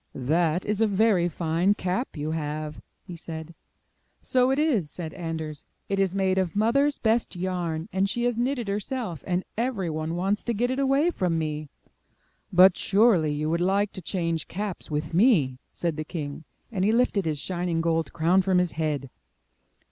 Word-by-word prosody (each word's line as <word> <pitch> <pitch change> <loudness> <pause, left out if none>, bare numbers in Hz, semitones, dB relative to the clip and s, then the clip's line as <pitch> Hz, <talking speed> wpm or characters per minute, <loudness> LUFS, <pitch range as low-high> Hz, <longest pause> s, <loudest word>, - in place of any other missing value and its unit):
'That 160 +6 +1
is 210 +1 -1
a 225 - +5
very 200 -4 +3
fine 170 +4 +1
cap 185 - -2
you 150 +1 -2
have, 150 -1 -4 0.2
he 175 - -9
said. 160 0 -7 0.7
'*So 255 0 +2
it 270 - +2
is," 265 - +1
said 160 -2 -6
Anders, 160 -3 -5 0.3
*'it 195 0 0
is 195 -1 +1
made 190 -1 +2
of 185 -2 -1
Mother's 275 +7 +2
best 225 -2 +1
yarn, 175 -3 -2
and 190 +1 +1
she 240 +3 -1
has 245 -1 +1
knit 255 +4 0
it 235 -4 -4
herself, 205 - -3
and 180 0 0
every 225 -9 -1
one 155 +1 -3
wants 195 +4 0
to 235 - -1
get 245 +4 +1
it 260 - -1
away 275 +5 +3
from 180 - 0
me.*' 155 -2 -3 0.8
''But 180 0 +7
surely 195 -7 +3
you 150 +1 -2
would 170 +1 0
like 195 +3 +2
to 185 - -7
change 165 -2 -2
caps 200 0 -5
with 150 +2 -3
me," 165 - +3
said 170 -3 -2
the 155 - -2
king, 150 -2 -6 0.3
and 190 -4 -1
he 210 - +4
lifted 225 -5 +2
his 155 -2 -1
shining 175 +1 -2
gold 165 -1 0
crown 170 +4 +3
from 185 -1 +2
his 180 -2 +2
head. 150 -3 -2
180 Hz, 185 wpm, -26 LUFS, 160-210 Hz, 0.8 s, But